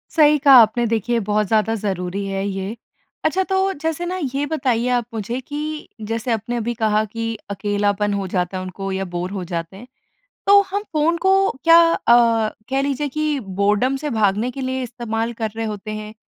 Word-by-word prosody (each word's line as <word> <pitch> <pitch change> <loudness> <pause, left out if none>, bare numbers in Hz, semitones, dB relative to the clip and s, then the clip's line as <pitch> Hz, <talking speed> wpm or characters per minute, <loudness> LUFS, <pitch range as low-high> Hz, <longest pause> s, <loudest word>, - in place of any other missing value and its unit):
सही 300 -2 +6
कहा 275 0 +6
आपने, 230 +2 +2
देखिए 230 +1 0
बहुत 210 0 0
ज़्यादा 220 +1 +2
ज़रूरी 195 -2 -3
है 195 0 -2
ये। 195 +2 -4 0.5
अच्छा 370 +5 +2
तो 385 0 0
जैसे 320 +2 -3
ना 365 +1 -3 0.2
ये 285 +1 0
बताइए 255 -6 0
आप 245 -2 +1
मुझे 225 +3 -3
कि, 300 +3 -5
जैसे 225 +3 -3
आपने 225 +2 -2
अभी 235 +1 -2
कहा 215 -2 +1
कि 230 +1 -4
अकेलापन 205 +1 0
हो 200 -1 -2
जाता 180 0 -2
है 185 - -4
उनको 195 +1 -5
या 190 0 -2
बोर 180 +2 -3
हो 195 -2 -4
जाते 170 +1 -5
हैं, 245 +5 -12 0.6
तो 405 0 +8
हम 405 +2 -1
फ़ोन 315 +2 +2
को 385 +2 +3
क्या 330 0 +8
अ, 230 -4 +3 0.2
कह 270 0 +2
लीजिए 285 +1 -1
कि 305 +1 -1
बोरडम 205 +5 0
से 295 - -1
भागने 215 0 +1
के 270 - -7
लिए 260 0 -2
इस्तेमाल 230 -1 -3
कर 220 - 0
रहे 225 - -2
होते 215 0 -5
हैं, 215 0 -6
225 Hz, 190 wpm, -21 LUFS, 205-275 Hz, 0.6 s, तो